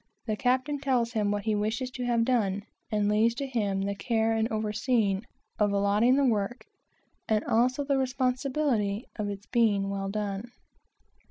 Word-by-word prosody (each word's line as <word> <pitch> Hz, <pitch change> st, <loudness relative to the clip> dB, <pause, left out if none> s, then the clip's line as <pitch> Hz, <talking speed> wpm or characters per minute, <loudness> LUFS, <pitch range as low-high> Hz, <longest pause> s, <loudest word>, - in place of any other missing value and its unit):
The 215 Hz, -3 st, -1 dB
captain 260 Hz, +5 st, 0 dB
tells 255 Hz, -4 st, +1 dB
him 210 Hz, -3 st, 0 dB
what 205 Hz, 0 st, -1 dB
he 220 Hz, 0 st, 0 dB
wishes 220 Hz, +5 st, -1 dB
to 250 Hz, -1 st, -4 dB
have 235 Hz, -1 st, +2 dB
done, 205 Hz, -6 st, +1 dB, 0.3 s
and 210 Hz, -2 st, +1 dB
leaves 220 Hz, +3 st, +3 dB
to 275 Hz, -, -3 dB
him 205 Hz, -7 st, -1 dB
the 200 Hz, 0 st, -1 dB
care 225 Hz, +2 st, 0 dB
of 225 Hz, 0 st, +1 dB
overseeing, 215 Hz, -1 st, 0 dB, 0.4 s
of 210 Hz, -1 st, +3 dB
allotting 200 Hz, +5 st, +3 dB
the 280 Hz, 0 st, +3 dB
work, 230 Hz, 0 st, 0 dB, 0.6 s
and 215 Hz, -1 st, +2 dB
also 255 Hz, +5 st, +2 dB
the 275 Hz, -1 st, +1 dB
responsibility 255 Hz, -4 st, 0 dB
of 210 Hz, -2 st, -2 dB
its 200 Hz, 0 st, -6 dB
being 205 Hz, -4 st, +2 dB
well 195 Hz, 0 st, -3 dB
done. 205 Hz, +3 st, -4 dB
220 Hz, 165 wpm, -28 LUFS, 205-250 Hz, 0.6 s, leaves